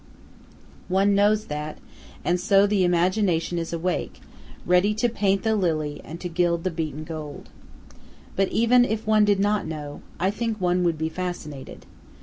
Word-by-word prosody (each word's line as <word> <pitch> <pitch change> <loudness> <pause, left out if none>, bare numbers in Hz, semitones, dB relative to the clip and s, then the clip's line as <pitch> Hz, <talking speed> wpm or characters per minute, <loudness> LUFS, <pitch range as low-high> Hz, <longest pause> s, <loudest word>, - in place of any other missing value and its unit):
One 195 +2 +3
knows 210 +2 +3
that, 150 +1 -5 0.5
and 180 0 +2
so 195 +2 +4
the 200 -2 +2
imagination 175 -1 +1
is 165 - -4
awake, 170 +2 -2 0.5
ready 180 +4 +3
to 235 +3 +2
paint 200 -4 0
the 220 -1 +2
lily 155 -6 -1
and 165 +2 -8
to 180 - -3
gild 170 -1 0
the 185 - -1
beaten 155 -2 -4
gold. 155 -2 -8 0.9
But 195 0 +2
even 235 +4 +4
if 220 -2 -2
one 215 -1 +4
did 205 -1 +2
not 205 -2 +1
know, 150 -2 -6 0.2
I 190 +2 +2
think 225 0 -3
one 180 0 +1
would 170 -2 +1
be 160 +1 -1
fascinated. 160 -6 -6
180 Hz, 160 wpm, -24 LUFS, 165-205 Hz, 0.9 s, so